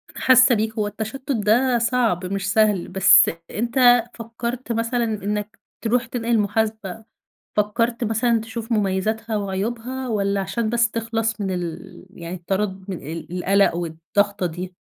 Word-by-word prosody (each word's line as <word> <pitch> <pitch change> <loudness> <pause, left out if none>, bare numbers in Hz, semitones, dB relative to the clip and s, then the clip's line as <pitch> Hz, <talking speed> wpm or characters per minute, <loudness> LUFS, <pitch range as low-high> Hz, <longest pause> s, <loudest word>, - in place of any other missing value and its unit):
حاسة 255 -1 +5
بيك، 220 +1 -1
هو 210 -2 -1
التشتت 220 +7 -5
ده 240 +3 +2
صعب 230 -6 +1
مش 195 +1 -2
سهل، 210 -5 +2
بس 190 +1 +6 0.2
أنت 245 +1 +4
فكرت 235 +2 -5
مثلًا 230 +1 0
إنك 210 -1 -3 0.2
ترُوح 235 +1 +1
تنقل 235 -1 0
محاسبة؟ 215 0 -2 0.5
فكرت 230 +3 0
مثلًا 225 +1 +1
تشوف 225 +1 -7
مميزاتها 215 +2 0
وعيوبها 230 +6 -3
والّا 200 -2 0
عشان 205 +4 -2
بس 235 0 +2
تخلَص 225 -1 -2
من 195 -1 -2
ال 175 0 -6
يعني 170 0 -7
التردد 190 +2 -3
من 185 - -3
ال-القلق 180 +3 +1
والضغطة 175 +4 -1
دي؟ 180 +2 -5
220 Hz, 135 wpm, -22 LUFS, 195-235 Hz, 0.5 s, بس